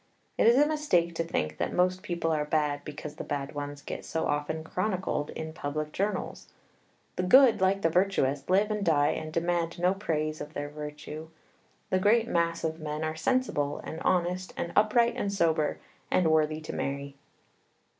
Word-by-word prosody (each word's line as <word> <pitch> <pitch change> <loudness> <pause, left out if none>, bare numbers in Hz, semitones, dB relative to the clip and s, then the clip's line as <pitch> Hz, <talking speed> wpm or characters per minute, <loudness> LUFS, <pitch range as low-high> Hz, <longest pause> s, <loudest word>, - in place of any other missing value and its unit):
It - - +3
is 235 +2 +6
a 290 - +6
mistake 290 - +1
to 165 - -1
think 75 - -2
that - - -1
most 185 +1 +2
people 170 -2 -2
are 155 -1 +1
bad 150 -1 0
because 150 0 -8
the - - -4
bad 140 0 -4
ones 145 0 -6
get - - -6
so 160 - -2
often 150 +2 -1
chronicled 185 -4 -2
in 160 0 -6
public 150 0 -4
journals. 205 +5 -3 0.7
The - - +1
good, 240 +4 +6
like 195 +1 +2
the 165 - +4
virtuous, 160 -7 +1
live 200 +3 +3
and 210 -1 -1
die 145 -5 +3
and 155 - -3
demand 170 0 -1
no 180 +2 +2
praise 155 -6 -2
of 150 +1 -8
their 145 0 -3
virtue. 150 +1 -7 0.6
The 185 - +3
great 220 +4 +3
mass 170 -4 0
of 160 0 -2
men 150 0 -4
are 155 0 -2
sensible, 160 - 0
and 160 - -6
honest 180 +1 0
and 170 - -3
upright 235 +3 +4
and 200 - -1
sober, 160 -6 +1 0.3
and 165 -3 +3
worthy 155 0 +2
to 155 - -6
marry. 140 0 -3
165 Hz, 180 wpm, -29 LUFS, 150-185 Hz, 0.7 s, is